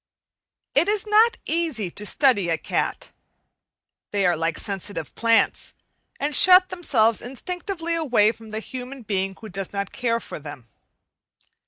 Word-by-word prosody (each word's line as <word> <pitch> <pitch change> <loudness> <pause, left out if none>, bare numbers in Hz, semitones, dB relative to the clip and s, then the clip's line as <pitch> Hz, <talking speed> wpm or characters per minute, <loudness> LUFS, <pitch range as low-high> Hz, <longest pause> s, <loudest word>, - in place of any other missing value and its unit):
It 300 +6 +3
is 420 0 +1
not 440 +2 +4
easy 310 - -1
to 210 +3 -5
study 240 - +2
a 165 - +1
cat. - - -3 1.0
They 200 -2 0
are 175 -1 +3
like 165 0 -2
sensitive 195 -5 -5
plants, 230 0 +1 0.4
and 295 +1 -1
shut 370 0 +7
themselves 245 - +1
instinctively 340 - -4
away 245 -10 +3
from 225 -1 -14
the 215 +1 -4
human 255 +2 -8
being 195 -2 -2
who 220 - -9
does 195 +1 -5
not 200 -1 -3
care 230 -1 0
for - - -8
them. 145 -5 -10
230 Hz, 145 wpm, -23 LUFS, 195-330 Hz, 1.0 s, shut